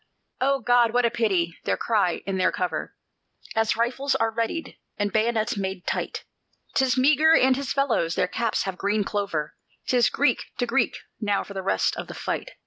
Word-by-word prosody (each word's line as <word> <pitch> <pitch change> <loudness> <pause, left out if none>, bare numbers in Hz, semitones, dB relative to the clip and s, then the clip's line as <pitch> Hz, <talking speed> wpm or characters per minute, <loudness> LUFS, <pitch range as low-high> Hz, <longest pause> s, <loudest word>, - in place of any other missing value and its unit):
"O 275 +1 +1
God! 245 -2 +3
what 245 0 +4
a 235 - +2
pity!" 185 -8 0
they - - +1
cry 205 -6 0
in 195 -1 -2
their 185 - +3
cover, 180 -1 -3 0.6
As 225 0 +1
rifles 255 +4 0
are 225 0 +1
readied 230 +9 -3 0.2
and 205 -2 -1
bayonets 220 -1 +1
made 190 -2 -4
tight; - - -3 0.5
"'Tis 265 -1 +2
Meagher 305 +4 +5
and 260 0 +4
his 275 -1 -4
fellows! 235 -12 +1
their - - +1
caps 230 +3 -1
have 190 -2 -5
green 205 +1 +1
clover; 195 -7 -2 0.3
'Tis 245 -3 +3
Greek 270 -4 +1
to 245 - 0
Greek 240 0 +1 0.2
now 205 -3 0
for 200 - -10
the 190 - -4
rest 190 - +1
of - - -5
the - - -8
fight!" - - -4
225 Hz, 185 wpm, -25 LUFS, 200-255 Hz, 0.6 s, Meagher